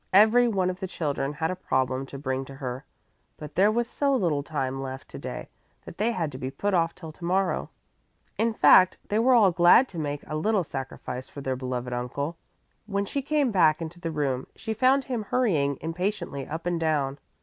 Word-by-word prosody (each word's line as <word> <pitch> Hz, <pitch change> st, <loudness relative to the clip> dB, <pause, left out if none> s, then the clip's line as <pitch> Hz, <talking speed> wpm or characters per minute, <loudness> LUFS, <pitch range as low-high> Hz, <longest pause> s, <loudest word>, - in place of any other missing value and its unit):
Every 220 Hz, +5 st, +6 dB
one 190 Hz, -5 st, +1 dB
of 180 Hz, -, -9 dB
the 190 Hz, -, -3 dB
children 145 Hz, -4 st, -2 dB
had 160 Hz, +3 st, -1 dB
a -, -, -3 dB
problem 130 Hz, -5 st, -1 dB
to 140 Hz, -, -8 dB
bring 130 Hz, -1 st, -2 dB
to 135 Hz, -, -10 dB
her, 130 Hz, 0 st, -5 dB, 0.5 s
but 150 Hz, -1 st, -9 dB
there 200 Hz, +3 st, +4 dB
was 235 Hz, +1 st, 0 dB
so 280 Hz, +2 st, +1 dB
little 165 Hz, -, +1 dB
time 135 Hz, -3 st, -3 dB
left 135 Hz, 0 st, -6 dB
to -, -, -8 dB
day -, -, -6 dB, 0.4 s
that -, -, -11 dB
they 225 Hz, +3 st, +2 dB
had 165 Hz, -9 st, -2 dB
to 130 Hz, -, -8 dB
be 130 Hz, -, -3 dB
put 200 Hz, +9 st, -2 dB
off 165 Hz, -2 st, +2 dB
till 160 Hz, -3 st, -9 dB
to 165 Hz, -, -16 dB
morrow. 185 Hz, +2 st, 0 dB, 0.7 s
In 230 Hz, +1 st, +1 dB
fact, 185 Hz, -4 st, +6 dB
they 210 Hz, -, +2 dB
were 255 Hz, +2 st, +5 dB
all 210 Hz, -5 st, +6 dB
glad 175 Hz, +9 st, +6 dB
to 170 Hz, -, -7 dB
make 145 Hz, -1 st, -3 dB
a 155 Hz, -, -5 dB
little 195 Hz, +5 st, +1 dB
sacrifice 130 Hz, -3 st, -6 dB
for 140 Hz, -, -9 dB
their 130 Hz, -1 st, -1 dB
beloved 125 Hz, -1 st, -4 dB
uncle. 140 Hz, +6 st, -3 dB, 0.5 s
When 200 Hz, -1 st, -1 dB
she 280 Hz, +7 st, -2 dB
came 285 Hz, -2 st, +1 dB
back 165 Hz, -5 st, +4 dB
into 165 Hz, +1 st, -7 dB
the 170 Hz, -2 st, -3 dB
room, 140 Hz, -5 st, -1 dB
she 220 Hz, 0 st, -4 dB
found 260 Hz, +5 st, +3 dB
him 245 Hz, -5 st, -3 dB
hurrying 160 Hz, -, +1 dB
impatiently 165 Hz, -4 st, -3 dB
up 160 Hz, +3 st, -5 dB
and 175 Hz, -1 st, 0 dB
down. 145 Hz, -4 st, 0 dB
165 Hz, 210 wpm, -26 LUFS, 140-205 Hz, 0.7 s, Every